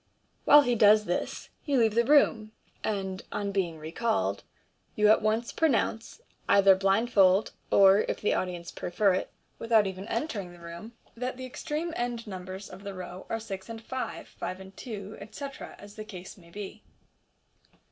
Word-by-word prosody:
While 295 0 +8
he 245 - +1
does 215 -1 +6
this, 175 - -3
you 285 -3 +1
leave 225 -3 +3
the 235 +2 +3
room, 230 -5 +3 0.3
and, 190 -3 -2
on 205 -1 -2
being 180 -5 -1
recalled, 155 - -1 0.5
you 210 0 +4
at 215 - +5
once 220 +2 0
pronounce, 270 - 0 0.3
either 195 -1 +7
blind 195 +5 +1
fold, 190 0 +5 0.2
or 195 0 +6
(if - - -2
the 210 - +1
audience 175 -2 -3
prefer 195 +2 +1
it) 185 - -2 0.3
without 225 -2 +4
even 190 +1 -5
entering 225 - -3
the 175 - -15
room, 170 +7 -9 0.2
that 250 +2 -4
the 260 - -6
extreme 305 +6 -4
end 240 -1 -3
numbers 190 -1 -7
of 185 +2 -12
the 200 -1 -6
row 180 0 -8
are 225 - -1
six 195 -2 -7
and 225 0 -6
five, 260 +2 -5
five 185 - -6
and 190 0 -12
two, 210 -3 -7
etc., 275 +7 -8
as 205 0 -12
the 215 - -7
case 190 -3 -10
may 170 -3 -18
be. 205 +3 -8
205 Hz, 170 wpm, -28 LUFS, 190-230 Hz, 0.5 s, While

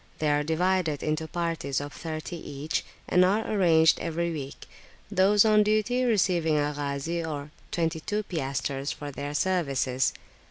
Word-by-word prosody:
They 150 -1 +1
are 145 0 +2
divided 165 0 0
into 155 +1 -1
parties 165 -5 -2
of 145 0 -6
thirty 160 +1 -5
each, 145 -1 -3 0.2
and 180 - +4
are 200 +4 +2 0.2
changed 160 -3 +5
every 170 +1 -2
week, 140 -3 -6 0.5
those 200 +2 +5
on 215 -1 +5
duty 215 +4 +2
receiving 180 -8 +2
a 145 0 0
Ghazi 145 +4 -2
or 150 -2 -5 0.2
twenty 165 -1 -1
two 210 +6 -2
piastres 140 -4 -3
for 145 -1 -6
their 145 +2 -5
services. 140 -7 +1
160 Hz, 150 wpm, -27 LUFS, 145-185 Hz, 0.5 s, changed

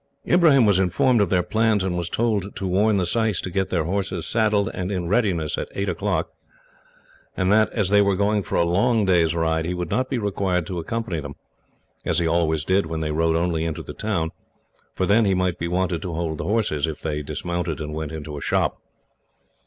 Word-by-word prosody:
Ibrahim 155 -8 +5
was 100 -3 +4
informed 100 +6 +3
of 100 - +1
their 90 -1 +2
plans, 110 -1 +1
and 95 -2 -1
was 85 -1 -2
told 105 -3 -1
to 95 - -3
warn 100 +3 +2
the 90 - +1
syce 110 0 0
to 95 - -5
get 95 +1 -1
their 85 -3 0
horses 95 +4 -2
saddled 105 -3 +1
and 95 +1 -3
in 90 -3 -2
readiness 90 -7 0
at - - -4
eight 100 +1 -1
o'clock, - - -1 1.1
and 95 0 +1
that, 110 0 +4
as 105 -5 0
they 105 0 +5
were 100 -1 +2
going 105 +2 +1
for - - -5
a 85 - +3
long 105 +5 +2
day's 85 -3 +3
ride, 80 -1 0
he 90 - -2
would 90 -2 -4
not 130 0 0
be 130 - -1
required 95 -5 -1
to 90 0 -4
accompany 105 -1 -3
them 70 -1 -7 0.7
as - - 0
he 85 - +2
always 80 -2 +1
did 95 -2 +2
when 80 0 -4
they 75 -1 -2
rode 80 +1 +1
only 85 -1 0
into 80 -2 -3
the - - -8
town, 90 -7 -2 0.6
for 95 - 0
then 105 +4 +4
he 95 -1 +2
might 90 -1 0
be 85 - -2
wanted 90 0 -1
to 90 -4 -4
hold 80 -2 -3
the - - -3
horses, 100 -9 0
if 80 - -5
they 75 -2 -3
dismounted 85 +1 -3
and 75 -1 -5
went 80 -1 -4
into 75 -1 -6
a - - -7
shop. - - 0
90 Hz, 220 wpm, -23 LUFS, 80-105 Hz, 1.1 s, Ibrahim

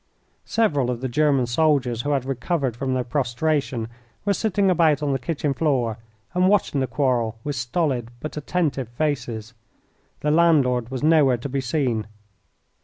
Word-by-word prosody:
Several 145 - +1
of 120 -1 -3
the 130 - -1
German 140 0 +2
soldiers 125 -2 +1
who 145 - -3
had 140 -3 0
recovered 135 -1 -1
from 130 +1 -2
their 125 - 0
prostration 130 -1 -1 0.4
were 200 - +3
sitting 200 -2 +1
about 155 -4 +3
on 140 -2 +1
the 135 - 0
kitchen 145 +1 -2
floor 125 -7 0 0.3
and 180 +1 +3
watching 200 -8 +2
the 130 - 0
quarrel 120 -4 0
with 145 -1 -3
stolid, 125 -1 -1
but 155 - -6
attentive, 150 -5 -1
faces. 120 -4 -3 0.7
The 150 - +1
landlord 140 -8 +3
was 130 +1 -5
nowhere 150 -5 +4
to 120 - -5
be 135 +1 -1
seen. 125 -5 -1
135 Hz, 160 wpm, -23 LUFS, 125-155 Hz, 0.7 s, nowhere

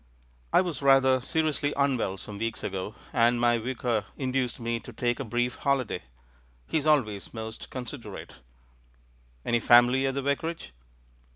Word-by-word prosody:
"I - - +6
was 170 -7 -4
rather 135 -1 +5
seriously 155 +1 0
unwell 130 -9 +1
some 100 +1 -9
weeks 115 0 -3
ago, 95 +2 -4 0.2
and 120 0 +3
my 120 -1 +3
Vicar 120 -2 -1
induced 130 -2 -1
me 115 0 -2
to 120 - -11
take 120 +1 -1
a - - -2
brief 120 +1 -1
holiday. 130 -9 0 0.6
He - - -1
is 150 - -3
always 115 -10 +1
most 110 0 -7
considerate." 120 -4 -8 1.1
"Any 120 - +2
family 120 +3 +5
at 135 - -2
the 140 - -2
vicarage?" 140 - -2
125 Hz, 150 wpm, -27 LUFS, 115-135 Hz, 1.1 s, I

